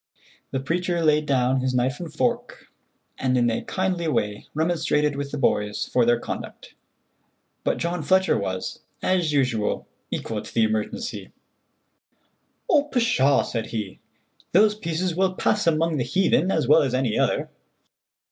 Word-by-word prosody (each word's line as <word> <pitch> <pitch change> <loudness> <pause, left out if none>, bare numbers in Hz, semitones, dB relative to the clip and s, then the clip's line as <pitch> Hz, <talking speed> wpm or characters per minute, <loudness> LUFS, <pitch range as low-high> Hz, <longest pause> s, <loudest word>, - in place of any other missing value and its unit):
The 135 - -2
preacher 170 +5 -1
laid 150 0 +3
down 130 -1 +2
his 130 0 -1
knife 130 +2 0
and 170 -3 -6
fork 240 +7 -2 0.5
and 130 -1 +1
in 120 -1 +3
a 115 - -2
kindly 185 -3 -1
way 105 -9 -1
remonstrated 150 -2 +1
with 140 0 -4
the 145 - -5
boys 105 -6 0
for 120 -2 +3
their 120 0 +3
conduct, - - -7 0.9
but - - 0
John 170 0 -2
Fletcher 190 +5 +3
was, 95 -2 -3 0.2
as 180 -4 +1
usual, 125 -7 0 0.2
equal - - -3
to - - -11
the 115 - +4
emergency. 110 - -3 1.4
"Oh, 295 -5 +4
pshaw," 230 - +2
said 115 -2 -3
he, 105 -4 -5 0.5
"those 210 +4 +5
pieces 175 -3 -2
will 185 0 +1
pass 210 -1 +1
among 165 0 +2
the 125 - 0
heathen 185 +7 +2
as 155 -8 0
well 155 +3 +6
as 130 -3 0
any 130 -4 0
other." - - 0
150 Hz, 150 wpm, -24 LUFS, 125-180 Hz, 1.4 s, well